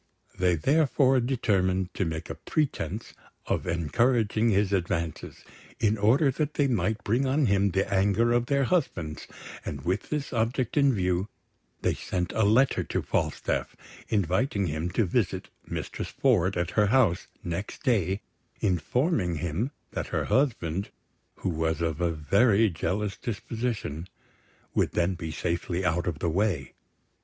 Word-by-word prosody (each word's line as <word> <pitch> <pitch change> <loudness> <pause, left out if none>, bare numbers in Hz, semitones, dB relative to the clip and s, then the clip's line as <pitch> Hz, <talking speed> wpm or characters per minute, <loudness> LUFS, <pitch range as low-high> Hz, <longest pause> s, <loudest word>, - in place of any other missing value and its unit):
They 90 -2 +3
therefore 135 - +3
determined 95 -7 +1
to 95 - -1
make 80 0 -4
a - - -2
pretence 105 - -2 0.3
of - - -1
encouraging 110 - +2
his 100 -1 +2
advances, 85 -3 -2 0.3
in 110 -1 +3
order 130 +8 +4
that 150 +2 -2
they 145 - +3
might 110 -3 0
bring 125 +6 +1
on 140 +2 +2
him 100 -2 +3
the 95 +2 0
anger 100 +5 +3
of 120 0 +1
their 140 -1 +2
husbands; 95 - -1 0.4
and 70 -2 -6
with 95 +4 -1
this 150 -3 -3
object 120 +1 0
in 140 -2 +5
view, 90 -2 0 0.5
they - - +2
sent 90 -1 -3
a 110 - 0
letter 115 +7 +4
to - - -2
Falstaff, - - -1 0.3
inviting 100 - +1
him 80 +1 -2
to 110 +4 +1
visit 85 - -1 0.2
Mistress - - -4
Ford 95 -9 +2
at 85 0 -1
her 105 +1 +3
house 110 -7 +3 0.2
next 85 +4 -5
day, 100 -5 +1 0.4
informing 95 - +1
him 85 - -2 0.2
that - - -3
her - - -1
husband, 100 - 0 0.5
who - - -3
was 80 -1 -1
of 80 -1 -1
a 85 - +2
very 100 +7 +3
jealous 95 +5 -2
disposition, 110 - -4 0.7
would - - +1
then 85 +2 +1
be 85 -3 -5
safely 85 +3 -2
out 85 +1 +1
of 85 -4 -1
the 85 - -1
way. 90 -8 0
100 Hz, 150 wpm, -27 LUFS, 85-120 Hz, 0.7 s, in